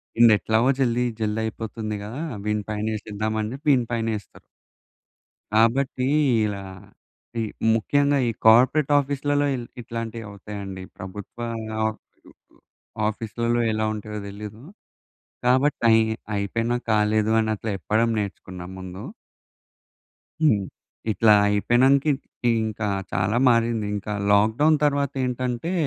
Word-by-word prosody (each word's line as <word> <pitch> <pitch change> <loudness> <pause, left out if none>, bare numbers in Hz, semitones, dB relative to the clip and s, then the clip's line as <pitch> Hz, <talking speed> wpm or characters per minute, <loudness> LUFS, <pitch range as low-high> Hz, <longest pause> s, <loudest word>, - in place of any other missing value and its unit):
వీన్దీ 115 -1 +7
ఎట్లాగో 110 +4 +2
జల్ది 125 -2 +2 0.2
జల్ది 110 0 -1
అయిపోతుంది 110 0 -4
గదా! 120 +9 -6 0.2
వీని 105 0 0
పైన 105 0 -2
ఏసేద్దాం 110 0 -3
అని 105 +1 -3
చెప్పి 145 +3 -9
వీని 125 -3 +3
పైనేస్తారు. 115 -3 -3 1.1
కాబట్టి 125 +3 +2 0.4
ఇలా 100 -2 -4 0.8
ఈ 115 - 0 0.3
ముఖ్యంగా 140 +6 +2
ఈ - - 0
కార్పొరేట్ 130 +6 +5
ఆఫీస్‌లలో 145 +1 0 0.4
ఇట్లాంటివి 115 0 -5
అవుతాయండి. 100 -2 -7
ప్రభుత్వ 95 +4 -9 0.5
ఆఫ్ 110 0 -2 1.1
ఆఫీస్‌లలో 115 +2 -1
ఎలా 110 0 0
ఉంటాయో 105 0 -6
తెలీదు. 105 +2 -9 0.8
కాబట్టి 130 +2 +2
అయ్ 110 0 +6 0.3
అయిపోయినా 115 +4 -1 0.2
కాలేదు 105 0 +2
అని 110 0 0
అట్ల 110 - -8
చెప్పడం 110 +5 +1
నేర్చుకున్నా 95 -3 -6
ముందు. 95 +2 -8 1.4
హ్మ్. 105 -10 +4 0.5
ఇట్లా 110 0 +5
అయిపోయినంక 120 +7 +3 0.4
ఇ - - +5 0.2
ఇంకా 110 0 -3 0.2
చాలా 95 +5 0
మారింది. 115 -2 +2
ఇంకా 105 +1 -4 0.2
లాక్‌డౌన్ 110 +10 +4
తర్వాత 140 -1 +1
ఏంటంటే, 125 +5 -2
110 Hz, 110 wpm, -24 LUFS, 105-125 Hz, 1.4 s, వీన్దీ